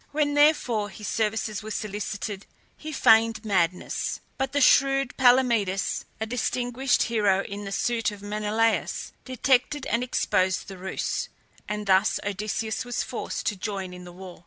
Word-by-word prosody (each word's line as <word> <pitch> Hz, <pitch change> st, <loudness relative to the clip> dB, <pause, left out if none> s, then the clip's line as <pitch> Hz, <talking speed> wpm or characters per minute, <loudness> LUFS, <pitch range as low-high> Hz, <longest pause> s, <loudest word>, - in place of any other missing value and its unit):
When 290 Hz, -1 st, +1 dB
therefore 290 Hz, -8 st, +3 dB
his 210 Hz, +1 st, -8 dB
services 215 Hz, -1 st, -1 dB
were 215 Hz, -, -8 dB
solicited 205 Hz, -1 st, -4 dB, 0.3 s
he 310 Hz, -, -8 dB
feigned 225 Hz, -4 st, +4 dB
madness; 180 Hz, -3 st, 0 dB, 0.2 s
but 270 Hz, -1 st, -2 dB
the 285 Hz, -, +1 dB
shrewd 275 Hz, -1 st, +4 dB
Palamedes, 240 Hz, -7 st, +3 dB
a 220 Hz, -, -1 dB
distinguished 245 Hz, +2 st, 0 dB
hero 205 Hz, -4 st, +2 dB
in 200 Hz, +1 st, -7 dB
the 195 Hz, -, -5 dB
suite 230 Hz, +2 st, 0 dB
of 205 Hz, -1 st, -10 dB
Menelaus, 215 Hz, +2 st, 0 dB
detected 260 Hz, +2 st, +1 dB
and 235 Hz, +1 st, 0 dB
exposed 185 Hz, -6 st, 0 dB
the 195 Hz, -2 st, -9 dB
ruse, 190 Hz, +1 st, -3 dB, 0.4 s
and 210 Hz, 0 st, -3 dB
thus 195 Hz, +1 st, +3 dB
Odysseus 215 Hz, +3 st, -2 dB
was 245 Hz, 0 st, -2 dB
forced -, -, -5 dB
to 225 Hz, -, 0 dB
join 190 Hz, -2 st, -4 dB
in 180 Hz, 0 st, -10 dB
the 175 Hz, -, -10 dB
war. 180 Hz, 0 st, -11 dB
215 Hz, 150 wpm, -26 LUFS, 200-250 Hz, 0.4 s, feigned